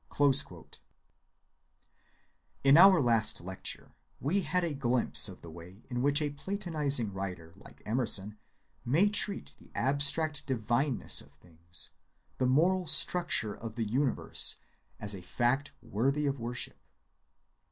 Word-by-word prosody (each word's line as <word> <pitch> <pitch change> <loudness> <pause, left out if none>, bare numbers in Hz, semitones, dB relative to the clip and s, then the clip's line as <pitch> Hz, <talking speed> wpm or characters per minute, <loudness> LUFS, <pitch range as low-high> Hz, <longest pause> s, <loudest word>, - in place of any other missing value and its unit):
(23) 140 -2 +3 2.0
In 135 +1 +5
our 185 +1 +7
last 115 -5 +1
lecture 95 +2 -6 0.3
we 180 +9 -1
had 180 -1 -2
a 165 -3 -2
glimpse 125 -5 +3
of 95 - -13
the 85 - -11
way 90 +6 -14
in 120 0 -3
which 145 +3 +2
a 145 - -3
platonizing 145 - -2
writer 90 -4 -7
like 95 - -17
Emerson 105 -3 0 0.4
may 160 +12 +2
treat 205 -1 +1
the - - -20
abstract 145 +4 +1
divineness 120 +2 -1
of - - -18
things, 85 0 -5 0.5
the 130 - +1
moral 175 +7 +1
structure 170 -15 +3
of 110 0 -9
the 115 -3 -3
universe, 130 +4 +2 0.4
as 105 -1 -1
a 95 - -8
fact 125 +10 -1
worthy 135 +8 -1
of 140 -1 -2
worship. 120 +1 -5
130 Hz, 130 wpm, -29 LUFS, 105-145 Hz, 2.0 s, our